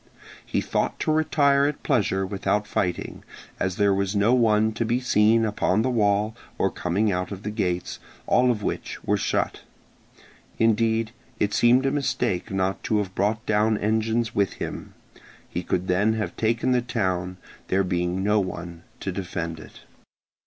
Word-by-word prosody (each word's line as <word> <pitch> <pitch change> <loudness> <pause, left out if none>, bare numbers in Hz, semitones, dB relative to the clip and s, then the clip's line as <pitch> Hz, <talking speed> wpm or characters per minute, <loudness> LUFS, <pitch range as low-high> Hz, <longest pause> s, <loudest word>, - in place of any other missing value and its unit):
He - - -1
thought - - -1
to - - +1
retire 145 -2 +3
at 150 - -4
pleasure 100 -7 +1
without 100 +2 -1
fighting, 90 -3 -2 0.4
as 90 -1 -1
there 100 0 +3
was 100 +1 -1
no 105 +4 +3
one 110 -3 +3
to 115 - -1
be 120 +2 0
seen 115 -2 +3
upon 105 -1 +1
the 130 - 0
wall 105 -1 +1 0.2
or - - +1
coming 100 +5 0
out 90 +1 -2
of 100 0 -7
the 105 - -3
gates, 90 -5 -2 0.3
all 125 0 +3
of 110 -4 0
which - - -4
were - - +1
shut. - - -1 1.0
Indeed, 115 0 +2 0.3
it 105 0 +1
seemed 120 +4 +4
a 135 - +2
mistake 125 -9 -1
not 95 0 -1
to 110 - +1
have 100 -3 -2
brought 110 +4 0
down 110 +1 +2
engines 110 +2 0
with 100 -2 +1
him; - - -6 0.5
he 90 - -4
could 90 +1 -2
then 100 +5 +2
have 110 -1 -3
taken 115 +3 +1
the 125 -1 +3
town, 95 -7 -2 0.3
there 95 +1 +2
being 90 0 -1
no 105 +1 +3
one 85 -3 -5 0.2
to 95 - -2
defend 85 -3 -4
it. - - -13
105 Hz, 165 wpm, -25 LUFS, 95-115 Hz, 1.0 s, seemed